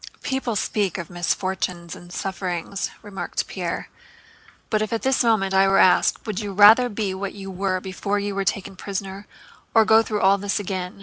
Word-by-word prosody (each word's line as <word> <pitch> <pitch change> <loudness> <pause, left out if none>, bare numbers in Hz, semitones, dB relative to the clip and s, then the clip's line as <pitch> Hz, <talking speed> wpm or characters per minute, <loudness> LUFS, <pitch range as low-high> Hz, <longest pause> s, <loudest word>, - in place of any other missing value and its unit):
"People 265 -4 -2
speak 200 -3 -1
of 170 -2 -7
misfortunes 175 -1 -2
and 175 0 -13
sufferings," 190 0 -3
remarked 205 -2 -4
Pierre, - - -4 0.8
"but 215 -1 +2
if 215 - -2
at 230 - -2
this 265 -1 +2
moment 215 -5 +2
I 195 0 +5
were 195 0 +3
asked: 185 - +4
'Would 215 -4 -3
you 205 -2 -4
rather 215 +5 +7
be 205 -3 -2
what 195 +1 -5
you 195 -1 -7
were 190 0 -1
before 195 +2 -3
you 205 0 -2
were 195 0 -1
taken 195 0 -2
prisoner, 195 +1 -6 0.5
or 220 -1 +6
go 220 +1 +6
through 215 -2 -3
all 195 +1 +4
this 200 +1 -1
again? 185 -1 -5
195 Hz, 185 wpm, -23 LUFS, 190-210 Hz, 0.8 s, rather